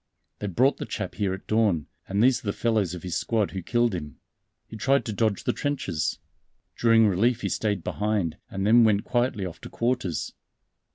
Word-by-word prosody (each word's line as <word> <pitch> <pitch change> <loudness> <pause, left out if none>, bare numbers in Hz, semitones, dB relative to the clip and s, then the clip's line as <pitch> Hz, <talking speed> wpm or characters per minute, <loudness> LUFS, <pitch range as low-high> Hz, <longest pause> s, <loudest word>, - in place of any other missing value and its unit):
They 105 - -3
brought 125 +9 +2
the - - -5
chap - - -4
here 100 -2 -1
at 95 +1 -6
dawn, 105 -9 +2 0.2
and 100 +3 +1
these 130 0 +4
are - - -8
the 100 - +1
fellows 110 -7 0
of 90 - -9
his 90 -2 -3
squad 110 +2 0
who 95 - -4
killed 120 +4 +1
him. 75 -6 -6 0.5
He - - -11
tried 135 +3 +2
to 110 - -3
dodge 105 -1 0
the - - 0
trenches. 100 - -2 0.6
During 115 -1 +5
relief 115 +6 +2
he - - -1
stayed 105 -5 -1
behind, 105 -6 -1
and 95 0 -3
then 115 +3 +6
went 105 -2 +3
quietly 120 -5 0
off 90 - -8
to - - -8
quarters. 120 -8 -1
105 Hz, 195 wpm, -26 LUFS, 95-120 Hz, 0.6 s, then